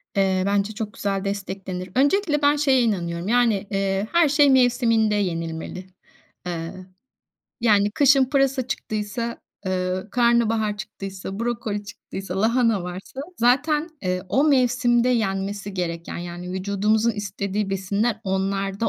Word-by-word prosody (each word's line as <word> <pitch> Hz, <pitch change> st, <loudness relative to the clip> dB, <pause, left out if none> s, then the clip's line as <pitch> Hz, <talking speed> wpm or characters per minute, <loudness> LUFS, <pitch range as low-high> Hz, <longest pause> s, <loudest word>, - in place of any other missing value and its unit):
Eee, 190 Hz, -1 st, +2 dB
bence 200 Hz, +1 st, 0 dB
çok 210 Hz, 0 st, -5 dB
güzel 195 Hz, -2 st, -2 dB
desteklenir. 190 Hz, -2 st, -4 dB
Öncelikle 295 Hz, +2 st, +2 dB
ben 290 Hz, 0 st, +4 dB
şeye 275 Hz, -3 st, +3 dB
inanıyorum, 175 Hz, -5 st, -1 dB
yani, 230 Hz, -4 st, +2 dB
eee, 195 Hz, 0 st, 0 dB
her 340 Hz, -3 st, +4 dB
şey 290 Hz, 0 st, +5 dB
mevsiminde 235 Hz, -4 st, +3 dB
yenilmeli. 165 Hz, -1 st, -3 dB, 0.6 s
Eee, 165 Hz, -1 st, -4 dB, 0.9 s
yani 210 Hz, -3 st, +4 dB
kışın 275 Hz, +3 st, +5 dB
pırasa 270 Hz, -1 st, +1 dB
çıktıysa, 220 Hz, 0 st, -4 dB, 0.3 s
ııı, 185 Hz, +1 st, -2 dB
karnabahar 225 Hz, -3 st, +2 dB
çıktıysa, 195 Hz, -2 st, -7 dB
brokoli 225 Hz, -3 st, -2 dB
çıktıysa, 195 Hz, -2 st, -6 dB
lahana 230 Hz, -2 st, +2 dB
varsa 180 Hz, +8 st, -7 dB, 0.2 s
zaten, 295 Hz, +6 st, +2 dB
eee, 185 Hz, -1 st, -1 dB
o 275 Hz, -, +3 dB
mevsimde 245 Hz, -2 st, +3 dB
yenmesi 200 Hz, -3 st, -1 dB
gereken; 170 Hz, -2 st, -4 dB
yani, 175 Hz, +1 st, -6 dB
vücudumuzun 205 Hz, +4 st, +1 dB
istediği 205 Hz, -1 st, -3 dB
besinler 200 Hz, +4 st, -1 dB
onlarda 195 Hz, +2 st, -1 dB
205 Hz, 120 wpm, -23 LUFS, 190-240 Hz, 0.9 s, şey